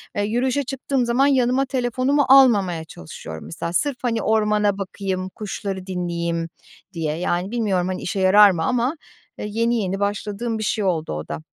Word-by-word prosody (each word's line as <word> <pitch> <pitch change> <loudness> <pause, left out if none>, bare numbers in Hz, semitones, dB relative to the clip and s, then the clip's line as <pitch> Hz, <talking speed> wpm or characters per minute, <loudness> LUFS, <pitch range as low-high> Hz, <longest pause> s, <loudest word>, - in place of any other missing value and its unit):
eee, 205 - 0
yürüyüşe 250 +6 0
çıktığım 270 -1 -2
zaman 245 +4 +3
yanıma 260 -1 +2
telefonumu 260 +2 +1
almamaya 205 -11 +5
çalışıyorum 80 - -9
mesela 170 +1 -5
sırf, 285 +4 0
hani, 230 -3 0
ormana 210 -2 +2
bakayım, 190 -1 -4
kuşları 195 -2 -5
dinleyeyim 170 -2 -2 0.4
diye. 155 -3 -2
Yani, 180 +2 -1
bilmiyorum, 200 -7 0
hani, 185 - -3
işe 195 - -3
yarar 200 +2 +7
mı 165 -3 -2
ama, 250 - 0 0.4
eee, - - -4
yeni 230 +3 +1
yeni 195 +1 -2
başladığım 210 +3 -2
bir 215 - -3
şey 210 0 -1
oldu 165 -4 -1
o 75 0 -5
da. 75 - -5
205 Hz, 165 wpm, -22 LUFS, 180-240 Hz, 0.4 s, yarar